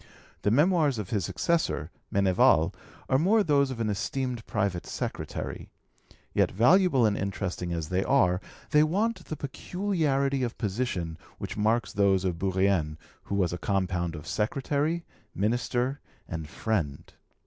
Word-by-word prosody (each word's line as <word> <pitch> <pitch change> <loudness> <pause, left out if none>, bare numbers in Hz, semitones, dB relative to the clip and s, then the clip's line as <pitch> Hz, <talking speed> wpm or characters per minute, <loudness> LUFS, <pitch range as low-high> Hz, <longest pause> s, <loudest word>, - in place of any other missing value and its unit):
The - - +2
Memoirs 150 - +3
of 105 -4 -5
his 100 -6 0
successor, 170 -1 0 0.2
Meneval, 95 -2 +4 0.3
are 130 - +3
more 205 +7 +4
those 140 -5 +3
of 130 -3 -5
an 115 - 0
esteemed 120 +4 -2
private 100 -5 -1
secretary; - - -5 0.6
yet, - - +3
valuable 135 - +4
and 105 -2 +2
interesting 95 -3 -3
as 85 -2 -3
they 95 +1 +1
are, 90 -9 +3 0.3
they 150 - +6
want 190 +5 +1
the 155 - -4
peculiarity 140 -3 -1
of 120 -2 -2
position 95 -7 -2 0.2
which - - -5
marks 110 +2 +1
those 95 -2 +3
of 85 -3 -1
Bourrienne, 95 -5 +1 0.3
who 100 - -3
was 90 -4 +1
a 90 - -4
compound 90 -3 -1
of 75 -1 -8
secretary, 140 - -1 0.3
minister, 120 +5 0 0.3
and 80 -3 -5
friend. 85 -11 -2
110 Hz, 140 wpm, -28 LUFS, 95-140 Hz, 0.6 s, they